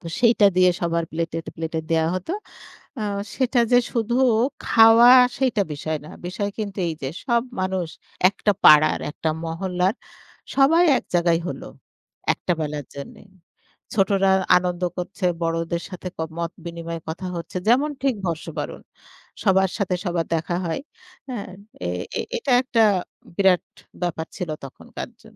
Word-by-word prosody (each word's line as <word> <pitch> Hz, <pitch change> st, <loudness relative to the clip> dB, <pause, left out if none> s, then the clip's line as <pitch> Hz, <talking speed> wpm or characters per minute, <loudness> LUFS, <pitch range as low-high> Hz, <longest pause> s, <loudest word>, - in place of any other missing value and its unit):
তো -, -, -11 dB
সেইটা 230 Hz, -3 st, +5 dB
দিয়ে 185 Hz, 0 st, +6 dB
সবার 170 Hz, -1 st, 0 dB
প্লেটে, 165 Hz, 0 st, -3 dB, 0.2 s
প্লেটে 160 Hz, 0 st, -3 dB
দেয়া 160 Hz, -1 st, +2 dB
হত। 185 Hz, -1 st, -5 dB, 0.7 s
আ -, -, -3 dB, 0.3 s
সেটা 255 Hz, -2 st, +2 dB
যে 245 Hz, -, +8 dB
শুধু 235 Hz, -1 st, 0 dB, 0.5 s
খাওয়া 225 Hz, +1 st, +7 dB, 0.3 s
সেইটা 250 Hz, -6 st, +2 dB
বিষয় 155 Hz, +2 st, -3 dB
না। -, -, -10 dB, 0.2 s
বিষয় 200 Hz, +3 st, -3 dB
কিন্তু 205 Hz, -2 st, -4 dB
এইযে 155 Hz, -4 st, -4 dB, 0.2 s
সব 235 Hz, -2 st, +2 dB, 0.2 s
মানুষ 185 Hz, -2 st, -1 dB, 0.4 s
একটা 205 Hz, +2 st, 0 dB
পাড়ার 155 Hz, 0 st, +7 dB
একটা 160 Hz, -, -3 dB, 0.2 s
মহল্লার 180 Hz, +3 st, -1 dB, 0.6 s
সবাই 310 Hz, +6 st, +5 dB
এক -, -, -10 dB
জায়গায় 170 Hz, -1 st, +3 dB
হল। -, -, -6 dB, 0.7 s
একটা 180 Hz, -, -2 dB
বেলার 150 Hz, -2 st, -3 dB
জন্যে। 140 Hz, -, -9 dB, 0.7 s
ছোটরা 195 Hz, -1 st, +3 dB, 0.3 s
আনন্দ 180 Hz, 0 st, -1 dB, 0.2 s
করছে 185 Hz, +2 st, -5 dB, 0.2 s
বড়দের 165 Hz, +1 st, -1 dB
সাথে 185 Hz, -1 st, -6 dB
ক -, -, -58 dB, 0.2 s
মত 170 Hz, 0 st, -2 dB
বিনিময়ে 170 Hz, 0 st, -5 dB
কথা 175 Hz, +4 st, -5 dB
হচ্ছে 170 Hz, +2 st, -7 dB
যেমন 270 Hz, +6 st, +4 dB
ঠিক 270 Hz, -2 st, +2 dB
বর্ষবরণ। 165 Hz, -2 st, -4 dB, 0.6 s
সবার 190 Hz, -2 st, +3 dB
সাথে 195 Hz, -3 st, 0 dB
সবার 175 Hz, -3 st, -1 dB
দেখা 165 Hz, +2 st, -2 dB
হয় 165 Hz, -, -2 dB, 0.5 s
হ্যাঁ? 230 Hz, -7 st, -5 dB, 0.4 s
এ -, -, -1 dB, 0.5 s
এটা 370 Hz, -, -1 dB
একটা 235 Hz, -3 st, +2 dB, 0.5 s
বিরাট 190 Hz, -3 st, +4 dB, 0.4 s
ব্যাপার 165 Hz, -2 st, -2 dB
ছিল 180 Hz, -4 st, -4 dB, 0.2 s
তখনকার 185 Hz, -, -8 dB
জ -, -, -21 dB
180 Hz, 140 wpm, -23 LUFS, 165-220 Hz, 0.7 s, যে